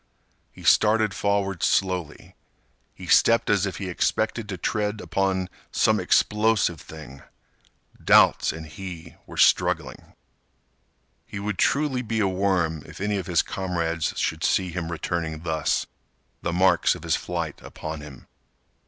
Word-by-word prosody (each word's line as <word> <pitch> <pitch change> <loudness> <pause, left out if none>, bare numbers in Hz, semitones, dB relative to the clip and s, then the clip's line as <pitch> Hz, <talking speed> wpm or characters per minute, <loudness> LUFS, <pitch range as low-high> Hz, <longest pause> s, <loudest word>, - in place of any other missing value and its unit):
He - - -15
started 110 0 +4
forward 100 -3 -1
slowly. 90 -5 -1 0.6
He - - -10
stepped 115 -2 +4
as 100 -1 +2
if 95 - -5
he 95 - -5
expected 110 +4 -1
to 95 - -4
tread 105 +4 -2
upon 95 -1 -1 0.2
some - - +2
explosive 105 -6 +2
thing. 75 -4 -11 0.8
Doubts - - +5
and 80 0 -8
he 85 +1 -9
were - - -11
struggling. - - +2 1.1
He - - -7
would 100 0 -4
truly 140 -3 +1
be 115 -2 -2
a 100 - +2
worm 90 -5 0
if - - -11
any 105 +1 -1
of 95 - -5
his 85 -2 +2
comrades 85 -4 -2
should 80 +1 -1
see 95 -2 +1
him 85 -1 -4
returning 80 -2 -3
thus, 80 -3 0 0.6
the 85 - -2
marks 90 +2 +3
of - - -11
his - - +1
flight 85 -4 -4
upon 80 -1 -7
him. 75 -4 -12
95 Hz, 140 wpm, -24 LUFS, 80-105 Hz, 1.1 s, Doubts